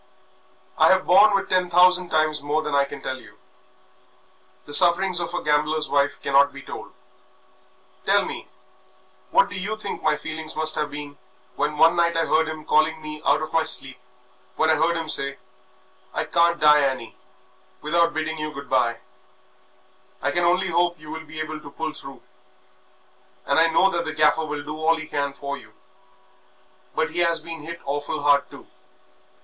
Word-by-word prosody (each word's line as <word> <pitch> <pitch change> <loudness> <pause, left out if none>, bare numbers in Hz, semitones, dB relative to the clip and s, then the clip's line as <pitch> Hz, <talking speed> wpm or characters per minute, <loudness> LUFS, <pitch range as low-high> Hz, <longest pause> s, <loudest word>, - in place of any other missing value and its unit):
I - - +6
have 190 0 0
borne 200 +3 +6
with 195 - -1
ten 185 -1 +1
thousand 180 0 +4
times 155 -1 +1
more 150 +2 -1
than 150 - -4
I 140 0 +3
can 140 0 -10
tell 130 0 -5
you. - - -18 1.3
The 145 - -10
sufferings 180 +2 +4
of 170 -1 -4
a - - -3
gambler's 150 +1 0
wife 145 0 +1
cannot 140 +1 +4
be 140 0 -11
told. - - -9 1.1
Tell - - +3
me, - - -7 0.8
what - - +4
do - - -9
you 215 +3 -3
think 210 -2 -6
my 150 - +2
feelings 160 +1 -6
must 155 0 +4
have 150 -1 -2
been 145 -1 -9 0.4
when 150 +2 -2
one 165 +2 +5
night 170 -1 +1
I 165 - +1
heard 160 +1 +2
him 155 -1 -7
calling 155 +1 +2
me 155 -1 -8
out - - +3
of 155 - -7
my 165 - +3
sleep, 135 -4 +2 0.6
when 160 0 +2
I - - +4
heard 170 +1 +1
him 165 -1 -4
say, 140 -2 0 0.8
'I - - 0
can't 170 0 +2
die, 150 0 +6
Annie, 130 -5 -2 0.7
without 170 +2 +1
bidding 155 0 -3
you 155 0 -4
good 140 -2 -10
bye. 120 -3 +1 1.2
I 145 - -1
can 175 +3 0
only 180 +2 +2
hope 175 0 +1
that 155 - -26
you 155 - -10
will 160 0 -7
be 155 +1 -10
able 155 0 -5
to 150 -1 -12
pull 155 +2 -5
through, 135 -3 -11 1.2
and - - +2
I 165 - +5
know 175 +4 +3
that 170 -1 -2
the 155 - -4
Gaffer 155 +1 +2
will 150 -1 -5
do 150 +1 -6
all 165 +1 +3
he 160 0 -7
can 145 -2 -2
for 140 0 -6
you, - - -16 1.2
but 160 0 -1
he 175 - -4
has 170 -1 +2
been 165 0 -9
hit 170 +3 -8
awful 145 +1 -3
hard 145 -1 +3
too. - - -13
155 Hz, 190 wpm, -23 LUFS, 145-170 Hz, 1.3 s, I